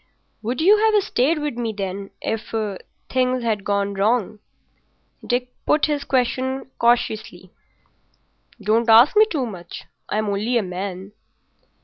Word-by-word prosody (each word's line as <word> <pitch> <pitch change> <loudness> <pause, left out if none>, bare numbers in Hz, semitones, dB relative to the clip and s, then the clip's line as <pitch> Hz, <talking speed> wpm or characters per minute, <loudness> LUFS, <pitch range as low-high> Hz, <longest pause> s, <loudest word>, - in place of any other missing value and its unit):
"Would 240 +5 -2
you 400 +6 +6
have 430 -2 +3
stayed 295 +3 +1
with 295 -5 -3
me, 230 -2 -2
then, 195 -1 -5
if—things 225 +4 -3
had 215 -4 -1
gone 200 0 0
wrong?" 215 +1 0 0.9
He 250 0 0 0.2
put 300 - +3
his 290 -2 -2
question 260 +1 -1
cautiously. 220 -6 0 1.1
"Don't 225 +2 +1
ask 235 - +7
me 430 +1 +6
too 285 - -1
much. 180 -6 -8 0.3
I'm 215 +1 0
only 210 +5 0
a 230 - +1
man." 185 +1 -6
230 Hz, 125 wpm, -22 LUFS, 200-260 Hz, 1.1 s, ask